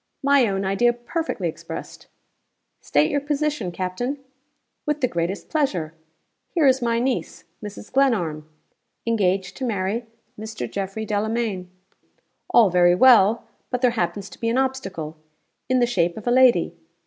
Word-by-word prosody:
'My 280 Hz, -3 st, +4 dB
own 195 Hz, -1 st, -1 dB
idea 220 Hz, +5 st, +3 dB
perfectly 240 Hz, -, -3 dB
expressed.' 160 Hz, -, -8 dB, 0.7 s
'State 150 Hz, +1 st, +2 dB
your 285 Hz, -, +1 dB
position, 295 Hz, -8 st, -1 dB
Captain.' 185 Hz, +10 st, -3 dB, 0.7 s
'With 300 Hz, 0 st, 0 dB
the 255 Hz, -, +2 dB
greatest 170 Hz, 0 st, -3 dB
pleasure. 190 Hz, -, -1 dB, 0.6 s
Here 330 Hz, -4 st, +1 dB
is 260 Hz, -1 st, +4 dB
my 235 Hz, -1 st, +1 dB
niece, 250 Hz, +1 st, -2 dB, 0.2 s
Mrs. 210 Hz, +2 st, -9 dB
Glenarm, 175 Hz, -, +1 dB, 0.6 s
engaged 190 Hz, -4 st, 0 dB
to 270 Hz, -, -5 dB
marry 220 Hz, 0 st, -1 dB, 0.3 s
Mr. 220 Hz, 0 st, -5 dB
Geoffrey 200 Hz, +2 st, -4 dB
Delamayn. 210 Hz, -3 st, -2 dB, 0.8 s
All 220 Hz, -6 st, +5 dB
very 175 Hz, 0 st, +5 dB
well, 230 Hz, -1 st, +6 dB, 0.3 s
but 250 Hz, -1 st, -2 dB
there 250 Hz, -, +5 dB
happens 190 Hz, -2 st, -2 dB
to -, -, -13 dB
be 230 Hz, -, 0 dB
an 235 Hz, -, +1 dB
obstacle 225 Hz, -13 st, -2 dB, 0.5 s
in 255 Hz, -, +3 dB
the 245 Hz, -, +4 dB
shape 175 Hz, -7 st, 0 dB
of 215 Hz, -, -8 dB
a 240 Hz, -, +1 dB
lady. 245 Hz, -10 st, +4 dB
220 Hz, 145 wpm, -23 LUFS, 185-255 Hz, 0.8 s, well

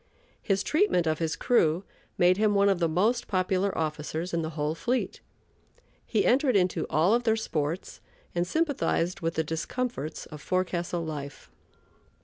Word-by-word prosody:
His 195 Hz, -2 st, 0 dB
treatment 310 Hz, -, +2 dB
of 155 Hz, -1 st, 0 dB
his 165 Hz, -1 st, -1 dB
crew 170 Hz, -4 st, +2 dB, 0.3 s
made 180 Hz, +1 st, +4 dB
him 210 Hz, -1 st, +2 dB
one 200 Hz, 0 st, +4 dB
of 195 Hz, -3 st, +2 dB
the 165 Hz, -2 st, +2 dB
most 220 Hz, +9 st, +1 dB
popular 190 Hz, +1 st, 0 dB
officers 160 Hz, +2 st, -3 dB
in 170 Hz, -, +1 dB
the 160 Hz, -, -3 dB
whole 150 Hz, +1 st, 0 dB
fleet. 235 Hz, +11 st, -2 dB, 0.9 s
He 220 Hz, -, +1 dB
entered 255 Hz, -1 st, +3 dB
into 185 Hz, -2 st, +1 dB
all 170 Hz, +7 st, +3 dB
of 240 Hz, -, +3 dB
their 225 Hz, -2 st, +2 dB
sports 165 Hz, -6 st, -3 dB, 0.3 s
and 175 Hz, 0 st, 0 dB
sympathized 280 Hz, -, 0 dB
with 165 Hz, 0 st, -2 dB
the 160 Hz, -, +1 dB
discomforts 160 Hz, -, -3 dB
of 150 Hz, -2 st, -10 dB
forecastle 175 Hz, -1 st, -1 dB
life. 145 Hz, -3 st, -7 dB
180 Hz, 155 wpm, -28 LUFS, 160-215 Hz, 0.9 s, made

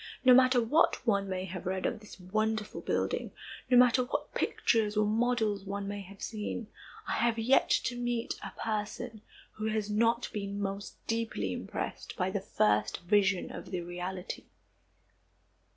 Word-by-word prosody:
No 255 Hz, -, +9 dB
matter 255 Hz, 0 st, +6 dB
what 250 Hz, +7 st, +3 dB
one 200 Hz, -4 st, +2 dB
may 185 Hz, 0 st, -2 dB
have 185 Hz, -1 st, -6 dB
read 185 Hz, 0 st, -1 dB
of 225 Hz, -, -1 dB
this 210 Hz, -2 st, -13 dB
wonderful 215 Hz, +3 st, -1 dB
building, -, -, -1 dB, 0.4 s
no 250 Hz, -, +6 dB
matter 250 Hz, +1 st, +6 dB
what 245 Hz, -, -3 dB
pictures 215 Hz, -2 st, +1 dB
or 215 Hz, -, +4 dB
models 220 Hz, -2 st, +1 dB
one 200 Hz, 0 st, -4 dB
may 205 Hz, 0 st, -4 dB
have 195 Hz, +1 st, -11 dB
seen, 220 Hz, +1 st, -4 dB, 0.4 s
I -, -, -2 dB
have 235 Hz, -1 st, +2 dB
yet 235 Hz, +4 st, +4 dB
to 245 Hz, -, +1 dB
meet 240 Hz, -1 st, -1 dB
a -, -, -4 dB
person 220 Hz, +1 st, -3 dB, 0.3 s
who 215 Hz, 0 st, -4 dB
has 215 Hz, -1 st, -1 dB
not 230 Hz, +3 st, +2 dB
been 200 Hz, -1 st, -3 dB
most 200 Hz, 0 st, -4 dB
deeply 225 Hz, -, -1 dB
impressed -, -, -5 dB
by -, -, 0 dB
the -, -, -1 dB
first 105 Hz, 0 st, +1 dB
vision 195 Hz, +1 st, +2 dB
of -, -, -8 dB
the 180 Hz, -2 st, -2 dB
reality. 180 Hz, +2 st, -5 dB
210 Hz, 160 wpm, -31 LUFS, 195-230 Hz, 0.4 s, No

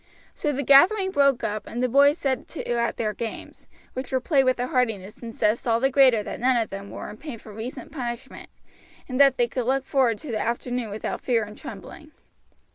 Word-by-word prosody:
So 295 Hz, -, -1 dB
the 280 Hz, 0 st, -2 dB
gathering 380 Hz, -, +5 dB
broke 280 Hz, -5 st, +3 dB
up 210 Hz, 0 st, -3 dB
and 240 Hz, +2 st, -3 dB
the -, -, +3 dB
boys 280 Hz, +4 st, +5 dB
set 265 Hz, -5 st, -2 dB
to -, -, -7 dB
at 235 Hz, -1 st, 0 dB
their 215 Hz, -2 st, -1 dB
games, 225 Hz, +1 st, -7 dB, 0.3 s
which 260 Hz, 0 st, -6 dB
were 260 Hz, -, +2 dB
played 270 Hz, 0 st, +2 dB
with 255 Hz, -1 st, +2 dB
a 245 Hz, -, 0 dB
heartiness 225 Hz, -6 st, -1 dB
and 230 Hz, -1 st, -6 dB
zest 220 Hz, +2 st, 0 dB
all 230 Hz, 0 st, +3 dB
the 270 Hz, +2 st, +1 dB
greater 255 Hz, -5 st, +5 dB
that -, -, -6 dB
none 255 Hz, 0 st, +3 dB
of 225 Hz, -3 st, -1 dB
them 195 Hz, +1 st, -7 dB
were -, -, -7 dB
in 210 Hz, -, -11 dB
pain 290 Hz, -4 st, -7 dB
from 215 Hz, -1 st, -13 dB
recent 230 Hz, +6 st, -7 dB
punishment, 255 Hz, -2 st, -6 dB, 0.6 s
and 255 Hz, +1 st, +1 dB
that 275 Hz, -2 st, +6 dB
they 240 Hz, -, +2 dB
could 240 Hz, 0 st, -3 dB
look 270 Hz, +1 st, +1 dB
forward 250 Hz, -5 st, +2 dB
to 300 Hz, 0 st, -8 dB
the 215 Hz, -, -1 dB
afternoon 240 Hz, 0 st, -2 dB
without 210 Hz, +2 st, -4 dB
fear 235 Hz, -3 st, +1 dB
and 210 Hz, 0 st, -9 dB
trembling. 270 Hz, -, -10 dB
250 Hz, 220 wpm, -25 LUFS, 225-270 Hz, 0.6 s, that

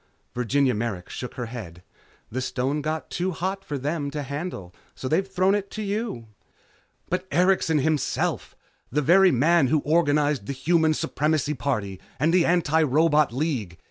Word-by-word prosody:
Virginia 130 Hz, +2 st, +1 dB
Merrick 105 Hz, -5 st, -3 dB
shook 125 Hz, -, -6 dB
her 125 Hz, -, -4 dB
head. 100 Hz, -8 st, -8 dB, 0.5 s
"The 130 Hz, +3 st, -2 dB
stone 130 Hz, +3 st, -1 dB
got 155 Hz, +1 st, -4 dB
too 180 Hz, +2 st, -1 dB
hot 190 Hz, +4 st, -3 dB
for 145 Hz, -, -4 dB
them 145 Hz, +2 st, -2 dB
to 145 Hz, 0 st, -4 dB
handle, 140 Hz, -, -6 dB, 0.2 s
so 130 Hz, -, -5 dB
they've 180 Hz, +7 st, +1 dB
thrown 190 Hz, 0 st, +2 dB
it 200 Hz, -1 st, -1 dB
to 215 Hz, -, -5 dB
you." 205 Hz, -, -3 dB, 0.8 s
"But 180 Hz, +1 st, -2 dB
Erikson, 180 Hz, -1 st, +3 dB
himself! 150 Hz, 0 st, -1 dB, 0.4 s
The 150 Hz, +4 st, +1 dB
very 190 Hz, +6 st, +6 dB
man 150 Hz, +3 st, +3 dB
who 155 Hz, -, +3 dB
organized 150 Hz, -6 st, +1 dB
the -, -, -2 dB
Human 160 Hz, +3 st, +2 dB
Supremacy 150 Hz, 0 st, 0 dB
Party 110 Hz, -9 st, -2 dB, 0.2 s
and 155 Hz, +4 st, +2 dB
the 180 Hz, -2 st, +4 dB
Antirobot 155 Hz, -3 st, +3 dB
League! 125 Hz, -, -2 dB
150 Hz, 155 wpm, -25 LUFS, 130-170 Hz, 0.8 s, very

